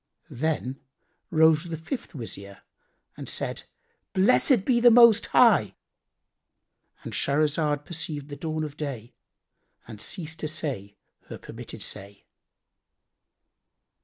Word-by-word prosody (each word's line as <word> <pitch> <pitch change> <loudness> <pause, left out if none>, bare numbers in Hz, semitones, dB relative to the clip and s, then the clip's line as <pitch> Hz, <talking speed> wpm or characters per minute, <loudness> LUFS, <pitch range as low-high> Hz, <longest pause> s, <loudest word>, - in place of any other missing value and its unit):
Then 135 -1 -2 0.5
rose 160 0 +4
the 165 -2 -5
fifth 180 - -6
Wazir 100 -6 -9 0.5
and - - -7
said, - - -2 0.5
"Blessed 210 +3 +3
be 245 -3 +3
the 240 0 +7
Most 235 -2 +6
High,"—And - - -2
Shahrazad 150 0 0
perceived 155 -4 -5
the 145 - -6
dawn 155 0 -3
of 150 -2 -6
day 125 -6 -6 0.7
and 110 -2 -10
ceased 165 -3 -5
to 155 - -3
say 130 -10 -4 0.3
her - - -8
permitted - - -8
say. 100 +1 -7
155 Hz, 105 wpm, -26 LUFS, 135-165 Hz, 0.7 s, the